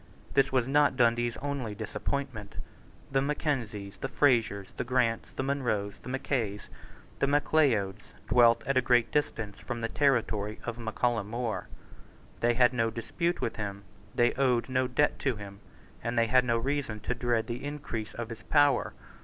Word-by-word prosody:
This 135 - +3
was 130 -2 +2
not 145 -1 +3
Dundee's 120 -1 +2
only 135 -7 -3
disappointment. 125 -3 -4 0.6
The 135 0 +2
Mackenzies, 125 -9 -2
the - - -3
Frasers, 115 -8 +2
the - - -1
Grants, 120 -2 0
the - - -2
Munros, 120 -8 -1
the - - -9
Mackays, 120 -6 -2 0.5
the 140 - +2
Macleods, 140 -9 +2 0.3
dwelt 115 0 +5
at 135 -1 +1
a - - +5
great 120 -1 +3
distance 115 -9 -1
from 120 -2 -5
the 115 - 0
territory 110 -6 +1
of 120 0 -5
Mac 110 -2 -5
Callum 115 -4 +1
More. 115 -4 -3 0.7
They 120 0 +2
had 125 0 +5
no 115 -2 +1
dispute 170 +11 -2
with 115 - -2
him; 100 -2 -4 0.3
they 120 0 +3
owed 130 -2 +1
no 130 0 +1
debt 140 +4 +1
to 135 -4 0
him: 100 -1 -9 0.4
and 115 +1 -2
they 115 - +5
had 125 +2 +4
no 120 -1 +2
reason 130 -3 -2
to 125 - -1
dread 120 -2 0
the 120 +2 -5
increase 140 -7 -5
of 120 -1 -5
his 115 - -8
power. 145 -1 +3
120 Hz, 170 wpm, -29 LUFS, 110-135 Hz, 0.7 s, dwelt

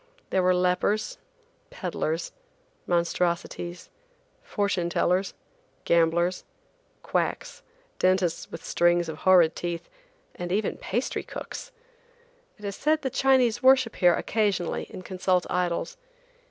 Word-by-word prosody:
There 190 - +3
were 185 0 +3
lepers, 185 - 0 0.5
peddlers, 165 - -3 0.6
monstrosities, 175 0 -1 0.5
fortune 200 - -1
tellers, 180 +2 +1 0.5
gamblers, 170 +2 +2 0.6
quacks, - - -2 0.4
dentists 185 -2 +1
with - - -8
strings 175 -1 +2
of 155 - -6
horrid 175 -3 +5
teeth, 170 -1 -4 0.5
and 175 0 -5
even 205 +2 0
pastry 240 +6 -2
cooks! - - -8 0.9
It 210 - -11
is 200 -1 -3
said 310 +1 +1
the 265 - -1
Chinese 255 -3 +3
worship 260 -3 +4
here 175 -2 +5
occasionally 200 -6 -1
and 185 - -9
consult 185 -1 0
idols. 180 - -1
185 Hz, 110 wpm, -26 LUFS, 175-215 Hz, 0.9 s, horrid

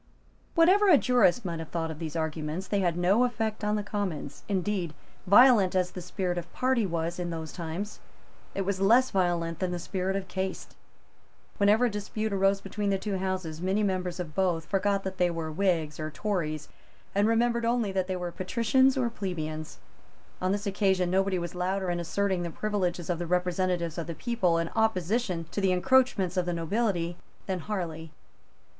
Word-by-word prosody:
Whatever 375 +5 +5
a 320 - +8
jurist 245 -4 +3
might 170 -2 -3
have 160 - -7
thought 165 -1 -2
of 155 - -8
these 160 -1 -5
arguments, 160 +2 -3
they 205 - 0
had 175 -3 +1
no 190 +7 +3
effect 225 -3 -1
on 210 0 +1
the 210 - -1
Commons. 190 -9 -4
Indeed, 190 -4 -1 0.3
violent 205 -2 +6
as 180 -1 +1
the 180 - -7
spirit 180 0 -2
of 170 - -10
party 255 -5 +1
was 170 0 -2
in 175 -1 -2
those 160 -2 -5
times, 175 +4 -5 0.6
it 195 - 0
was 190 0 -2
less 240 +6 +5
violent 175 -3 0
than 185 - 0
the 180 - -2
spirit 190 +2 -2
of 195 -1 -3
caste. 190 +1 -4 0.8
Whenever 210 +4 +4
a - - +2
dispute 210 +1 -3
arose 195 0 +2
between 200 +1 -3
the 195 - +2
two 195 0 -3
Houses, 185 -4 -3
many 190 +3 +1
members 185 -2 -1
of 165 -4 -5
both 175 -2 0
forgot 200 0 0
that 190 0 -5
they 180 -1 +4
were 165 -2 -3
Whigs 160 -4 0
or 155 0 -3
Tories, 155 -3 -2 0.5
and 205 +2 +3
remembered 235 +1 +2
only 230 -3 +1
that 190 -1 -1
they 185 - -2
were 180 -1 -4
Patricians 235 +9 +2
or 240 -3 +1
Plebeians. 155 -7 -5 0.6
On 185 +1 +1
this 205 +1 -1
occasion 190 -3 +1
nobody 190 0 +2
was 175 -1 -4
louder 185 +1 -1
in 175 - -1
asserting 190 +2 0
the 170 - -3
privileges 180 -2 -2
of 170 - -2
the 175 - -3
representatives 180 -1 0
of 165 - -4
the 170 - -5
people 225 -8 +1
in 165 0 -1
opposition 210 -4 0
to 205 - -2
the 190 -1 +3
encroachments 195 -3 +2
of 180 -1 +1
the 175 - 0
nobility 175 0 -1 0.3
than 190 -2 -2
Harley. 165 -5 -4
185 Hz, 190 wpm, -28 LUFS, 170-205 Hz, 0.8 s, a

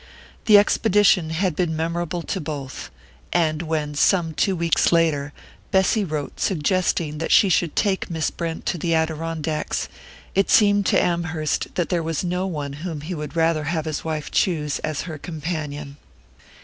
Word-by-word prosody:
The 210 -2 +8
expedition 205 -4 +3
had 170 +1 0
been 170 -2 0
memorable 170 +1 -2
to - - -3
both; 145 -3 -6 0.4
and 160 -2 +1
when, 155 -3 -2
some 165 +2 +2
two 190 +5 +1
weeks 170 -1 +2
later, 155 -4 +2 0.4
Bessy 190 +3 +3
wrote 155 -5 -4
suggesting 165 -3 0
that 165 - -2
she 200 - +6
should 170 -2 +1
take 195 -2 0
Miss 160 -2 -1
Brent 165 -1 -5
to 175 - -1
the 165 +1 +1
Adirondacks, 160 -1 -2 0.4
it 195 0 +2
seemed 205 -2 +4
to - - +4
Amherst 165 -3 -1
that 175 - -1
there 175 -2 +1
was 165 0 -2
no 180 +1 -1
one 145 -6 -4
whom 165 -4 -4
he 165 +5 -5
would 150 -1 -6
rather 165 -2 +2
have 160 0 -1
his 155 -2 -3
wife 155 -2 -4
choose 150 -6 0
as 155 -2 -3
her 160 -3 -7
companion. 150 -3 -5
165 Hz, 160 wpm, -23 LUFS, 155-180 Hz, 0.4 s, The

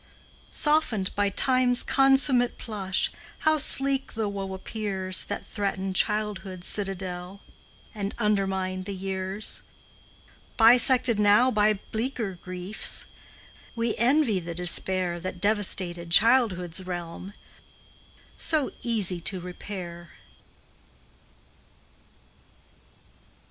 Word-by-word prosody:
Softened 295 -11 +1
by 200 0 +1
Time's 250 +3 +2
consummate 270 -2 +3
plush, 195 -4 -2 0.3
How 310 0 +3
sleek 270 0 +2
the 220 -2 -2
woe 195 -1 -4
appears 190 -2 -3
That - - -5
threatened 195 -2 -3
childhood's 205 -4 0
citadel 190 -1 -3 0.5
And 205 -2 -4
undermined 190 -3 -1
the 200 0 -5
years! 190 +2 -3 1.0
Bisected 240 0 +6
now 210 +5 +5
by 210 -1 +3
bleaker 220 -5 -3
griefs, 185 +3 -2 0.7
We 230 -1 0
envy 245 -4 +3
the 170 -1 -7
despair 180 0 -2
That 185 0 -6
devastated 185 -4 0
childhood's 185 -4 +3
realm, 175 +2 -6 1.0
So 310 -4 +1
easy 200 -7 0
to 185 +2 -2
repair. 175 -1 -8
200 Hz, 90 wpm, -26 LUFS, 185-230 Hz, 1.0 s, Bisected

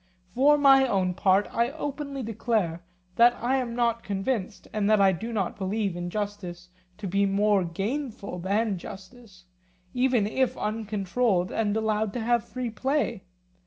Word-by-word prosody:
For 290 +4 +5
my 270 -2 +6
own 190 -5 +1
part 195 +2 +3
I 235 +1 +2
openly 280 -3 -4
declare 215 -6 -1 0.4
that 240 +1 +6
I 255 +3 +1
am 240 -3 -3
not 235 -1 +1
convinced, 200 +1 -3
and 210 -1 0
that 215 -1 +5
I 195 -1 +5
do 220 +6 -5
not 205 -3 -2
believe 195 -1 -1
injustice 180 -1 -5 0.3
to 210 - -7
be 200 +2 +2
more 200 0 +2
gainful 200 - -4
than 200 +2 0
justice, 195 0 -12 0.5
even 250 -4 +2
if 255 +5 0
uncontrolled 210 -2 -1
and 215 -1 0
allowed 215 -1 0
to 245 - -3
have 235 0 +1
free 245 0 -5
play. 270 +6 -1
215 Hz, 150 wpm, -26 LUFS, 195-240 Hz, 0.5 s, my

